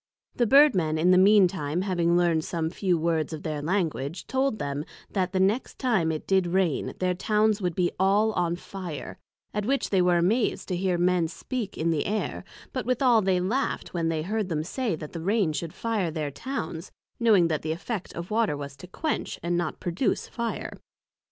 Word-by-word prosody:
The 240 - +2
Bird 280 +3 +7
men 160 -4 0
in 175 +3 +4
the 185 - +6
mean 200 0 +7
time 170 -1 -2
having 175 -3 +2
learned 170 -3 +2
some 165 -1 -2
few 185 -2 +1
words 160 -1 0
of 155 - -6
their 155 -2 -3
Language, 165 -3 -2
told 265 -3 0
them, 140 -3 -3 0.3
That 185 -2 0
the 190 - 0
next 200 +7 +1
time 215 -11 +1
it 155 - -4
did 190 -2 +2
rain, 175 -4 0
their 185 0 +1
Towns 210 +2 +1
would 175 -3 -1
be 180 -1 +1
all 200 +3 +3
on 175 -4 0
fire; 175 -6 -7 0.3
at 210 - -1
which 275 +1 0
they 190 -2 +4
were 180 -1 +4
amaz'd 210 +8 +1
to 185 - 0
hear 180 0 0
Men 175 -1 +2
speak 225 +5 -5
in 165 +1 +1
the 155 -3 0
air; 210 +1 -2 0.3
but 255 -2 -3
withall 250 -2 +4
they 190 -2 +2
laughed 220 +10 -1
when 165 -2 0
they 160 -1 -1
heard 210 +2 -2
them 155 -2 -1
say 220 +2 -2
that 155 +2 -9
rain 185 0 +1
should 165 +1 -4
fire 220 -5 -1
their 155 -2 -3
Towns; 165 - -5 0.3
knowing 210 -8 +5
that 155 -2 -1
the 155 - -3
effect 190 +4 -4
of 170 +3 -6
Water 220 -9 +1
was 140 -1 -7
to 180 - -11
quench, 310 - -3
not 175 -1 -1
produce 180 +7 -1
Fire. 235 -1 -4
180 Hz, 195 wpm, -26 LUFS, 165-210 Hz, 0.3 s, Bird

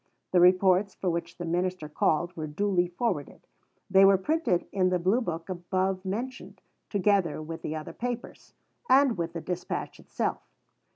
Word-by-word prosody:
The 180 - +4
reports 185 +2 +4
for 185 - -1
which 170 +1 -4
the 175 - -5
minister 180 -1 -1
called 165 +3 0
were 155 -1 -4
duly 180 +3 +1
forwarded. 175 - -3 0.4
They 190 0 +6
were 195 0 +7
printed 295 - 0
in 185 -2 +2
the 180 - +2
Blue 190 +8 +2
book 165 -6 -4
above 185 +1 -2
mentioned, 235 +7 -5 0.3
together 195 -6 +1
with 160 +1 -7
the 155 - -4
other 155 -1 -6
Papers, 245 0 -6 0.3
and 270 -3 +5
with 170 -1 -3
the 165 - -5
dispatch 180 +1 -4
itself. - - -3
185 Hz, 160 wpm, -28 LUFS, 170-200 Hz, 0.4 s, were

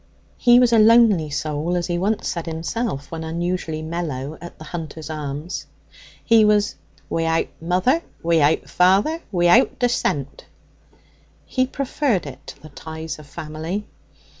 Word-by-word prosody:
He 240 0 +6
was 245 -2 +4
a 225 - +6
lonely 215 -7 +5
soul, 155 +4 -2
as 175 - -1
he 175 -1 -1
once 205 +4 0
said 170 -1 -3
himself 165 - -3
when 165 -1 -5
unusually 165 -1 -3
mellow 155 -4 -4
at 175 - -10
the - - -10
Hunter's 160 -1 -7
Arms; 150 +2 -5 0.6
he 230 -2 +6
was 210 -1 +3 0.3
'wi'out 165 0 0
mother, 185 - +2 0.2
wi'out 160 -2 +2
father, 195 - +3
wi'out 175 +6 +4
descent.' 195 - -1 1.0
He 255 0 0
preferred 260 - -1
it 140 - -10
to - - -10
the 155 - -11
ties 160 +2 -7
of 150 - -13
family. 160 +8 -5
170 Hz, 140 wpm, -22 LUFS, 155-210 Hz, 1.0 s, He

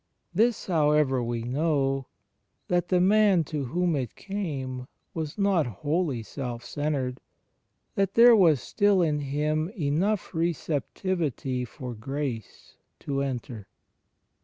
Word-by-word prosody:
This, 225 +4 +2
however, 150 -6 +2
we 120 -1 -2
know 135 0 0 0.3
— - - -49
that 175 0 +1
the 180 0 +3
man 195 -1 +4
to 150 -2 -3
whom 175 +5 0
it 130 -5 -3
came 135 -11 -4 0.3
was 160 0 -4
not 195 -8 +2
wholly 145 - -1
self 120 +1 -6
centred; 135 -4 -2 0.7
that 195 -1 0
there 235 0 +8
was 165 - +5
still 200 -3 +3
in 150 -2 +1
him 150 +3 -1
enough 170 +9 0
receptivity 160 - -1
for 125 0 -7
Grace 130 0 -5 0.2
to 140 -1 -2
enter. 120 -6 -4
150 Hz, 120 wpm, -27 LUFS, 130-180 Hz, 0.7 s, there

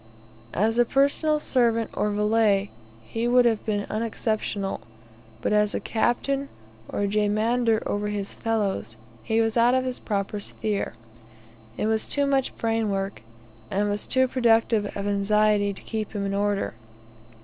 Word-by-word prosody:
As 225 +5 +2
a - - +7
personal 285 +4 +2
servant, 230 -5 +1
or 210 - 0
valet, 210 -1 +2 0.3
he 230 - -2
would 245 0 +5
have 225 -3 +2
been 205 -1 0
unexceptionable, 215 - -2 0.6
but - - +1
as 210 0 +3
a - - 0
captain 275 +5 0 0.4
or 205 - -1
jemadar 215 +3 +1
over 205 0 -1
his 205 -1 -3
fellows, 205 - -2 0.2
he 220 - 0
was 225 +1 0
out 240 +2 +5
of 260 0 +1
his 255 -1 -3
proper 205 0 -2
sphere. 205 - -2 0.8
It - - -1
was 220 0 +1
too 285 0 +1
much 270 -1 0
brain 225 -1 0
work, 195 - -3 0.5
and 205 +2 0
was 205 - -2
too 260 0 +3
productive 230 -4 +2
of 200 - -3
anxiety 205 0 +2
to 195 - -10
keep 220 -2 -4
him 200 -2 -2
in 195 - -2
order. 205 0 0
215 Hz, 150 wpm, -25 LUFS, 205-235 Hz, 0.8 s, a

